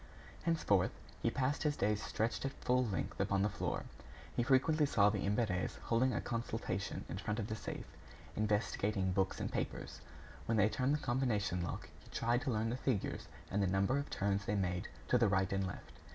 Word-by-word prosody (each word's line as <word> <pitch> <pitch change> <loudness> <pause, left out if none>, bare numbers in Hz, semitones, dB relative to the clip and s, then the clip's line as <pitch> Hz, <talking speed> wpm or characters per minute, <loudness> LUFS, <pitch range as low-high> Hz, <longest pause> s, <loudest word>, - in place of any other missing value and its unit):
Henceforth, 155 - +3 0.3
he - - +3
passed 135 +1 0
his 150 -1 +1
days 105 +1 +1
stretched 110 +2 -1
at 135 0 -2
full 125 0 +2
length 95 -6 -3
upon 100 -1 +2
the 105 - +3
floor. - - -2 0.5
He - - +2
frequently 140 +4 +4
saw 105 -6 +5
the 105 - -1
Imberts 100 -2 0
holding 125 +3 +3
a - - 0
consultation 115 -4 -3
in 90 - -4
front 105 +1 -2
of 115 - -1
the 110 - -3
safe, 105 - -5 0.5
investigating 105 -2 +1
books 95 0 +1
and - - -2
papers. - - -3 0.5
When 115 - +2
they 105 0 +5
turned 135 +4 +1
the 150 - -4
combination 115 -8 +1
lock, 85 - -4
he - - -17
tried 120 +1 +1
to 135 - -1
learn 110 0 0
the 125 - -1
figures 125 -6 -1 0.2
and 100 - +1
the 100 - +3
number 100 +8 +2
of 140 - -4
turns 100 0 0
they 105 - 0
made 90 -2 0 0.2
to 125 - +5
the 115 - +5
right 95 -1 +2
and 95 -1 +1
left. 90 - -8
105 Hz, 195 wpm, -36 LUFS, 100-125 Hz, 0.5 s, saw